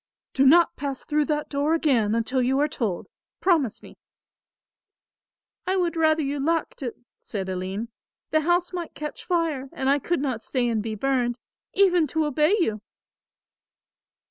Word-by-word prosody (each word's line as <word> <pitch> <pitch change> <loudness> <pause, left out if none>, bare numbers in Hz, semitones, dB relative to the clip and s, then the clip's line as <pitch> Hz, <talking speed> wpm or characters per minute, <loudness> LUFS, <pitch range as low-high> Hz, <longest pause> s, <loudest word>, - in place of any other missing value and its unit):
"Do 270 0 +4
not 340 +4 +5
pass 275 -2 -4
through 300 -1 +1
that 300 -1 -1
door 290 +3 +1
again, 235 -10 +2
until 250 +3 0
you 260 +2 +1
are 295 - +3
told. 220 -11 -3 0.3
Promise 315 - +1
me." - - -14 1.7
"I 375 - +1
would 345 -2 0
rather 315 -1 +3
you 280 +1 -2
locked 325 +2 -1
it," 245 -4 -4 0.2
said 195 -3 -4
Aline. 190 +4 -4 0.4
"The 310 - +3
house 350 +3 +1
might 350 -2 -5
catch 300 -1 -6
fire 320 -7 -1
and 265 +1 0
I 285 - +3
could 345 +5 -1
not 260 -5 -2
stay 250 +1 -1
and 225 -2 0
be 220 0 -4
burned, 245 0 0 0.4
even 360 -5 +4
to 315 +3 0
obey 300 +6 +3
you." 215 - 0
285 Hz, 160 wpm, -25 LUFS, 245-320 Hz, 1.7 s, not